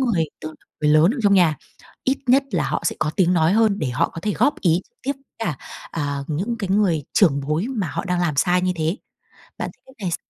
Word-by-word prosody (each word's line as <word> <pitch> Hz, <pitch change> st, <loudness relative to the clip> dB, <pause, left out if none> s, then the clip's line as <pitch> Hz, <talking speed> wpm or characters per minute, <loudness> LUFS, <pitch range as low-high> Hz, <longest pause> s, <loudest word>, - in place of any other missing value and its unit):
người 220 Hz, -11 st, +2 dB, 0.2 s
tức 155 Hz, 0 st, -7 dB, 0.3 s
người 150 Hz, -, +3 dB
lớn 155 Hz, +5 st, +6 dB
ở 270 Hz, -, -5 dB
trong 200 Hz, -1 st, +5 dB
nhà, 170 Hz, -6 st, +4 dB, 0.5 s
ít 265 Hz, +1 st, +1 dB
nhất 265 Hz, +3 st, +5 dB
là -, -, 0 dB
họ -, -, -2 dB
sẽ -, -, -1 dB
có 150 Hz, -, 0 dB
tiếng 180 Hz, -1 st, +3 dB
nói 165 Hz, 0 st, +3 dB
hơn 215 Hz, -1 st, +3 dB
để 145 Hz, -, -1 dB
họ 125 Hz, -, +1 dB
có 165 Hz, -, -8 dB
thể 210 Hz, +2 st, -1 dB
góp 290 Hz, -, +1 dB
ý 170 Hz, -1 st, +3 dB
trực -, -, -53 dB
tiếp 275 Hz, +3 st, 0 dB, 0.3 s
cả, 175 Hz, -12 st, -2 dB, 0.3 s
à, 145 Hz, -3 st, -2 dB
những 190 Hz, +11 st, -2 dB
cái 195 Hz, -, -3 dB
người 185 Hz, -8 st, +2 dB
trưởng 150 Hz, -9 st, +4 dB
bối 160 Hz, +8 st, 0 dB
mà 205 Hz, -9 st, -2 dB
họ 145 Hz, -, -3 dB
đang 180 Hz, -1 st, 0 dB
làm 160 Hz, -5 st, 0 dB
sai 180 Hz, +3 st, +3 dB
như 185 Hz, 0 st, +1 dB
thế. 160 Hz, +5 st, 0 dB, 0.6 s
Bạn -, -, -3 dB
thấy -, -, -37 dB
cách 265 Hz, -, -18 dB
này 175 Hz, -, 0 dB
s -, -, 0 dB
180 Hz, 250 wpm, -22 LUFS, 155-210 Hz, 0.6 s, lớn